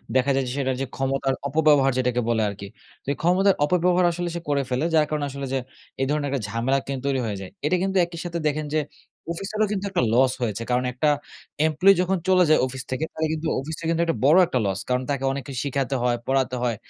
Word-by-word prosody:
দেখা 130 +2 +3
যায় 135 - +1
যে - - -3
সেটা 130 -1 0
যে - - 0
ক্ষমতার 135 0 0
অপব্যবহার 145 -2 +4
যেটাকে 125 -1 +1
বলে 115 -1 +2
আরকি। 100 0 -8 0.4
তো - - -31
এই - - -11
ক্ষমতার 185 +3 +3
অপব্যবহার 180 +2 +2
আসলে 175 +1 -3
সে - - -2
করে 140 -1 +2
ফেলে। 125 +4 0
যার 155 -1 +4
কারণে 150 -2 -1
আসলে 140 0 -5
যে - - +2 0.4
এই 135 - +2
ধরনের 150 -1 0
একটা 135 -3 -2
ঝামেলা 115 +6 0
কিন্তু 135 -2 -3
তৈরি 135 -1 +1
হয়ে 105 -3 -3
যায়। 95 - -7 0.2
এটা 170 +5 +2
কিন্তু 195 0 0
একই 170 -1 -9
সাথে 170 -1 -3
দেখেন 150 +1 -1
যে, - - +4 0.5
অফিসেরও 205 +5 -1
কিন্তু 200 -1 -2
একটা 180 - +1
লস 130 +2 +4
হয়েছে। 115 -1 -2
কারণ 125 +1 +2
একটা 150 +5 0 0.6
এমপ্লয়ি 170 +6 +5
যখন 185 +1 +1
চলে 185 -1 +5
যায় 155 - +5
অফিস 130 0 -5
থেকে, 130 +5 -2
তাহলে 160 0 -1
কিন্তু 160 0 -3
অফিসটার 160 +4 -6
কিন্তু 165 0 +1
একটা 165 - -1
বড় 155 +5 +6
একটা 130 - 0
লস। 95 -1 -1
কারণ 125 +1 +1
তাকে 135 -1 -1
অনেক 135 0 -4
কিছু 130 -4 -4
শিখাতে 135 -1 -1
হয়, 125 -1 +2
পড়াতে 130 -1 +1
হয়। 120 -2 0
140 Hz, 230 wpm, -24 LUFS, 130-165 Hz, 0.6 s, বড়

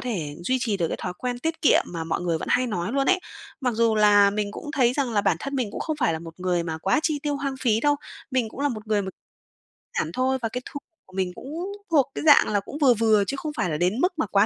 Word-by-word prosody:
thể 175 -12 -3
duy 260 +6 +2
trì 220 -5 0
được 170 -3 0
cái - - -3
thói 180 - -3
quen 245 -1 -3
tiết 325 +4 -3
kiệm - - +5
mà 165 -2 -5
mọi 160 - -2
người 170 -2 0
vẫn - - -6
hay 255 - +3
nói 195 -1 -2
luôn 275 0 +1
ấy. 370 0 +3 0.4
Mặc 250 -3 0
dù 230 -1 +3
là 205 -1 +6
mình 205 0 -2
cũng 295 - -7
thấy 250 -3 +3
rằng 260 -3 -1
là 205 - +3
bản 195 -5 +2
thân 275 0 -4
mình 245 -5 0
cũng - - -6
không 310 -2 -2
phải 250 - +1
là 160 - -2
một 165 +2 -11
người 180 -2 +1
mà 160 -1 -4
quá 195 - +2
chi 305 -2 0
tiêu 290 -1 -1
hoang 275 -1 -3
phí 225 -3 +2
đâu. 290 0 +3 0.3
Mình 255 -4 0
cũng 250 - -10
là 290 - +2
một 215 -4 -6
người 210 -2 +1
m 190 - -5 0.9
giản 155 - -2
thôi, 260 +4 +1
và 225 - -1
cái 250 +3 -4
thu - - -7 0.3
của 185 - -21
mình 185 -1 0
cũng 320 +7 -6 0.3
thuộc 280 -4 +3
cái - - -3
dạng 295 - +7
là 205 - +3
cũng 240 +8 -8
vừa 275 -5 +5
vừa 220 -2 +3
chứ 275 - -2
không 305 +1 -4
phải 180 - 0
là 150 - -1
đến 180 +8 +1
mức 360 +5 +2
mà - - +2
quá 200 +1 +3
230 Hz, 290 wpm, -25 LUFS, 190-275 Hz, 0.9 s, dạng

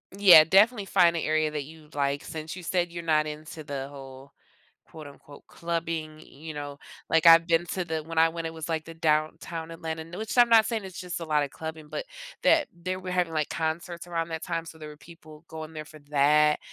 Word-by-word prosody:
Yeah, 185 -6 +9
definitely 205 +4 +4
find 175 -3 +3
a 165 - -2
area 155 0 +1
that 150 -2 -4
you'd 155 0 -15
like 140 0 -1
since 155 +1 -7
you 180 - -9
said 175 0 -1
you're 170 0 -6
not 155 -2 +2
into 155 +1 -8
the 140 -2 -5
whole, 135 -1 -12 0.5
quote, 155 -1 -12
unquote, 145 0 -15
"clubbing," 165 -2 -4
you 155 +2 -10
know? 145 -1 -7 0.3
Like, 165 0 +2
I've 165 0 +8
been 170 0 +2
to 185 - -2
the 160 -1 -3
when 165 +1 -8
I 165 0 +5
went, 165 0 -5
it 160 - -7
was, 160 0 -7
like, 160 -1 -2
the 165 - -9
Downtown 160 +1 -1
Atlanta, 160 -1 -6
nu 170 +2 -10
which 220 +3 -5
I'm 240 -1 +7
not 225 -1 +6
saying 220 -4 -3
it's 185 -1 -9
just 180 -2 -5
a 165 - -6
lot 150 -2 +1
of 140 - -4
clubbing, 160 -1 -8
but - - -5 0.4
that 310 -4 +4
they 180 +2 -4
were 185 0 -6
having, 175 -2 0
like, 155 -2 -1
concerts 170 +2 -4
around 165 -1 -3
that 160 -1 -5
time, 165 -2 -3
so 165 - -11
there 155 -1 -9
were 150 - -11
people 155 -1 -15
going 160 0 -8
there 155 -1 -7
for 155 0 -14
that, 150 +1 +4
160 Hz, 230 wpm, -27 LUFS, 155-170 Hz, 0.5 s, Yeah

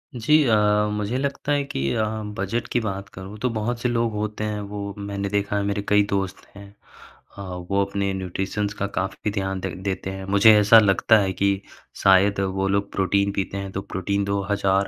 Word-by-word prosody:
जी। 150 +7 +4
अ, 115 -4 +3 0.4
मुझे 105 +4 -2
लगता 140 +1 -2
है 145 -1 +2
कि 70 - -2
अ, 110 -1 +1 0.3
बजट 100 +5 -2
की 120 - +2
बात 100 -3 -4
करूँ, 95 +3 -9
तो 125 - 0
बहुत 115 +2 -2
से 125 - +1
लोग 115 -1 0
होते 105 0 -3
हैं। 105 -1 -2
वो 100 0 -6
मैंने 100 0 -4
देखा 100 0 -1
है 100 - 0
मेरे 100 0 -1
कई 105 0 +5
दोस्त 95 -1 -2
हैं 100 0 -11 0.7
अ, - - -7
वो 95 +2 -2
अपने 100 0 -2
न्यूट्रिशन 95 +2 -2
का 100 - 0
काफ़ी 95 +2 -2
ध्यान 95 -2 -2
दे 95 - -3
देते 95 -1 -3
हैं। 95 0 -7
मुझे 110 +2 +8
ऐसा 110 +2 +7
लगता 105 +2 +4
है 95 -1 0
कि 100 0 0 0.4
शायद 100 +1 +5
वो 95 0 -1
लोग 100 +1 0
प्रोटीन 100 +1 +1
पीते 100 0 -2
हैं। 100 -1 -5
तो 95 - -4
प्रोटीन 100 +1 -2
2000, 100 -1 0
100 Hz, 200 wpm, -23 LUFS, 95-105 Hz, 0.7 s, मुझे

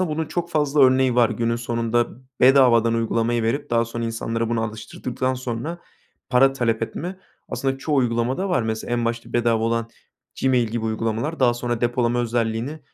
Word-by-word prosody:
bunun 160 -3 -1
çok 170 +2 -3
fazla 150 -2 +1
örneği 130 -1 +5
var 120 -1 +4
günün 115 +1 -1
sonunda. 120 0 0 0.3
Bedavadan 125 -3 +5
uygulamayı 115 0 0
verip 115 +5 -1
daha 115 0 +3
sonra 115 0 -5
insanlara 115 0 -2
bunu 115 -1 0
alıştırdıktan 115 +4 -3
sonra 130 +6 -4 0.5
para 135 +2 +5
talep 115 -4 0
etme 180 +10 -4 0.3
aslında 135 0 -2
çoğu 145 +2 -1
uygulamada 125 +8 0
var. 175 -10 +1
Mesela 110 +1 -3
en 120 -1 0
başta 115 0 -3
bedava 115 -2 +2
olan 115 0 0 0.5
Gmail 125 -3 +3
gibi 115 0 -3
uygulamalar 115 +8 -2
daha 120 -2 +4
sonra 120 -1 -3
depolama 120 0 +1
özelliğini 120 +5 -2
120 Hz, 160 wpm, -22 LUFS, 115-130 Hz, 0.5 s, örneği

